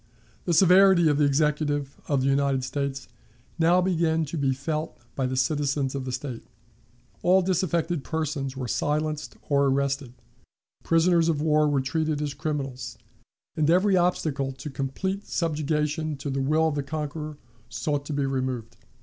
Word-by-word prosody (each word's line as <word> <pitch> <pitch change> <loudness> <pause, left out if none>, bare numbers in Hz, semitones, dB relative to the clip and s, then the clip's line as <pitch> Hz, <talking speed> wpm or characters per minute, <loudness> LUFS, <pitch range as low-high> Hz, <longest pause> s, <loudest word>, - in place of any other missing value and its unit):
The 175 - +1
severity 185 0 +6
of 145 0 +1
the 150 - +5
Executive 145 -1 0
of 140 -3 +1
the - - +1
United 135 -1 +2
States 135 0 -3 0.5
now 170 +2 +4
began 165 -3 +1
to 150 - -6
be 140 -3 +1
felt 155 +4 -3 0.2
by 135 -2 0
the 130 0 -3
citizens 140 0 0
of 135 -2 -4
the 130 - -3
State. 130 -2 -5 0.8
All 185 +1 +4
disaffected 175 -4 0
persons 145 -4 -3
were 130 -2 -3
silenced 150 +4 -2
or 140 -1 +3
arrested, 140 -1 0 0.7
prisoners 165 0 +3
of 155 -3 +1
war 155 0 +3
were 145 -2 +2
treated 155 +2 -1
as 150 -1 -2
criminals, 135 -7 -4 0.6
and 155 -1 +1
every 185 +3 +4
obstacle 155 -6 +1
to 135 +3 -8
complete 170 +9 -3
subjugation 155 -1 -1
to 140 +1 -4
the 135 0 -1
will 155 +4 +2
of - - -3
the 145 - -1
conqueror 150 +1 -5 0.3
sought 145 -2 -2
to 150 - -3
be 140 -1 0
removed. 130 -4 -3
150 Hz, 160 wpm, -26 LUFS, 135-160 Hz, 0.8 s, severity